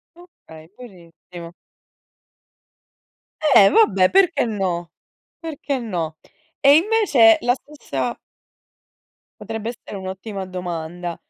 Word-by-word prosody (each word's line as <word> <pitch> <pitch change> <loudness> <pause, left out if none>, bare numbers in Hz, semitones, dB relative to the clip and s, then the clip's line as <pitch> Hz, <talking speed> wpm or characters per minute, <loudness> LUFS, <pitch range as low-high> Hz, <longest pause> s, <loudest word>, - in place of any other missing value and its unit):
Okay, 165 - -17
benissimo. 175 -6 -13 2.0
Eh 195 -1 +8
vabbè, 195 - +4
perché 350 -9 +3
no, 185 -6 -3 0.5
perché 295 -4 -4
no. 170 -9 -4 0.4
E 280 +1 +6
invece 325 - +4
la 245 - +2
stessa 290 +3 -6 1.2
Potrebbe 225 0 -5
essere 240 -3 -10
un'ottima 190 +1 -7
domanda. 175 -1 -6
210 Hz, 85 wpm, -21 LUFS, 175-280 Hz, 2.0 s, Eh